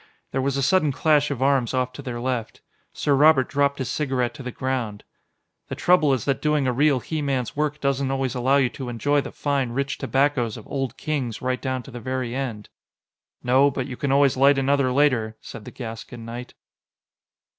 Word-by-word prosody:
There 130 Hz, -, -1 dB
was 140 Hz, 0 st, 0 dB
a 135 Hz, -, 0 dB
sudden 155 Hz, -1 st, +3 dB
clash 150 Hz, 0 st, +2 dB
of 135 Hz, -3 st, -2 dB
arms 135 Hz, -3 st, +2 dB
off 125 Hz, 0 st, -1 dB
to 140 Hz, -, -8 dB
their 125 Hz, -3 st, -5 dB
left. 120 Hz, -2 st, -3 dB, 0.3 s
Sir 145 Hz, -, 0 dB
Robert 140 Hz, -2 st, +5 dB
dropped 140 Hz, 0 st, +1 dB
his 130 Hz, -, -3 dB
cigarette 130 Hz, -5 st, -1 dB
to 150 Hz, -, -10 dB
the 125 Hz, -, -5 dB
ground. 120 Hz, -6 st, -3 dB, 0.6 s
"The -, -, -5 dB
trouble 175 Hz, -5 st, +3 dB
is 130 Hz, -5 st, 0 dB
that 140 Hz, -1 st, 0 dB
doing 150 Hz, -2 st, +1 dB
a 125 Hz, -, +1 dB
real 140 Hz, 0 st, +3 dB
he 155 Hz, +4 st, -3 dB
man's 135 Hz, -5 st, -2 dB
work 150 Hz, 0 st, -1 dB
doesn't 140 Hz, -1 st, 0 dB
always 135 Hz, -1 st, -1 dB
allow 130 Hz, +2 st, +2 dB
you 130 Hz, -3 st, +3 dB
to 130 Hz, -1 st, -7 dB
enjoy 145 Hz, +5 st, +1 dB
the -, -, -7 dB
fine, 140 Hz, -4 st, -1 dB
rich 140 Hz, +2 st, -2 dB
tobaccos 135 Hz, -5 st, +1 dB
of 110 Hz, -, -11 dB
Old 135 Hz, -3 st, -3 dB
Kings 135 Hz, -7 st, -3 dB
right 130 Hz, 0 st, -2 dB
down 130 Hz, -2 st, -2 dB
to 135 Hz, -, -12 dB
the 120 Hz, -, -7 dB
very 130 Hz, 0 st, -3 dB
end." 125 Hz, -6 st, -4 dB, 0.7 s
"No, 130 Hz, +3 st, +4 dB
but 130 Hz, -2 st, -3 dB
you 125 Hz, -, -6 dB
can 140 Hz, +1 st, -2 dB
always 140 Hz, -1 st, +4 dB
light 140 Hz, +2 st, +5 dB
another 135 Hz, -1 st, +2 dB
later," 125 Hz, -6 st, +2 dB
said 115 Hz, -2 st, -10 dB
the -, -, -8 dB
Gascon 115 Hz, -1 st, -8 dB
knight. 120 Hz, +2 st, -8 dB
135 Hz, 205 wpm, -24 LUFS, 125-140 Hz, 0.7 s, Robert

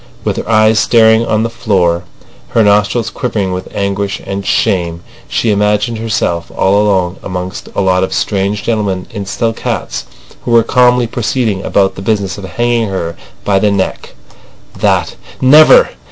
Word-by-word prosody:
With -, -, -2 dB
her -, -, -5 dB
eyes 110 Hz, 0 st, +4 dB
staring 110 Hz, 0 st, +4 dB
on 110 Hz, 0 st, +1 dB
the 115 Hz, -, -1 dB
floor, 90 Hz, -7 st, 0 dB, 0.4 s
her 115 Hz, -, +2 dB
nostrils 105 Hz, +3 st, +2 dB
quivering 105 Hz, -6 st, -2 dB
with 90 Hz, +1 st, -5 dB
anguish 100 Hz, 0 st, -2 dB
and 100 Hz, 0 st, -4 dB
shame, 85 Hz, -3 st, 0 dB, 0.2 s
she 115 Hz, -, 0 dB
imagined 105 Hz, +3 st, 0 dB
herself 85 Hz, -7 st, -2 dB
all 100 Hz, +2 st, +3 dB
alone 95 Hz, -3 st, 0 dB
amongst 90 Hz, -1 st, -6 dB
a -, -, +1 dB
lot 95 Hz, -1 st, +2 dB
of 95 Hz, -, -2 dB
strange 100 Hz, 0 st, -1 dB
gentlemen 100 Hz, -5 st, -1 dB
in 100 Hz, -1 st, -6 dB
silk 115 Hz, +3 st, -2 dB
hats -, -, -3 dB, 0.4 s
who -, -, -5 dB
were 115 Hz, -1 st, +5 dB
calmly 125 Hz, +1 st, +3 dB
proceeding 115 Hz, -3 st, -1 dB
about 95 Hz, -1 st, +1 dB
the 95 Hz, -, -9 dB
business 100 Hz, -1 st, -1 dB
of 100 Hz, -, -7 dB
hanging 120 Hz, +3 st, -1 dB
her 85 Hz, -3 st, -4 dB, 0.3 s
by 100 Hz, -1 st, +2 dB
the 105 Hz, -, +2 dB
neck. 100 Hz, -2 st, -3 dB, 0.6 s
That—never! 155 Hz, -, +4 dB
100 Hz, 155 wpm, -13 LUFS, 95-115 Hz, 0.6 s, were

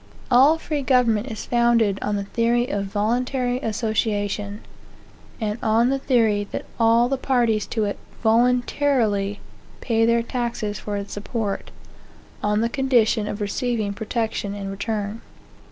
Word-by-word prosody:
All 270 Hz, +6 st, +6 dB
free 305 Hz, -2 st, -3 dB
government 250 Hz, -4 st, +2 dB
is 220 Hz, -4 st, -6 dB
founded 235 Hz, -4 st, +2 dB
on 210 Hz, -, -1 dB
the 200 Hz, -, -2 dB
theory 235 Hz, +4 st, +1 dB
of 200 Hz, 0 st, -1 dB
voluntary 245 Hz, +5 st, 0 dB
association; 210 Hz, -2 st, -2 dB, 0.8 s
and 215 Hz, 0 st, -2 dB
on 225 Hz, +3 st, +3 dB
the 275 Hz, -, 0 dB
theory 225 Hz, -6 st, +2 dB
that -, -, -5 dB
all 230 Hz, +1 st, +4 dB
the 270 Hz, +1 st, -1 dB
parties 235 Hz, -6 st, +1 dB
to 220 Hz, -, -1 dB
it 205 Hz, -1 st, -2 dB, 0.2 s
voluntarily 235 Hz, -3 st, +2 dB, 0.4 s
pay 225 Hz, -2 st, +1 dB
their 235 Hz, 0 st, +3 dB
taxes 235 Hz, -4 st, -3 dB
for 205 Hz, -1 st, -4 dB
its 200 Hz, 0 st, -6 dB
support, 205 Hz, 0 st, -3 dB, 0.7 s
on 210 Hz, +1 st, +1 dB
the 230 Hz, -, +2 dB
condition 235 Hz, -4 st, +2 dB
of 210 Hz, -, -4 dB
receiving 215 Hz, 0 st, -1 dB
protection 220 Hz, -1 st, -3 dB
in 195 Hz, -1 st, -5 dB
return. 210 Hz, +1 st, -3 dB
225 Hz, 135 wpm, -23 LUFS, 205-245 Hz, 0.8 s, All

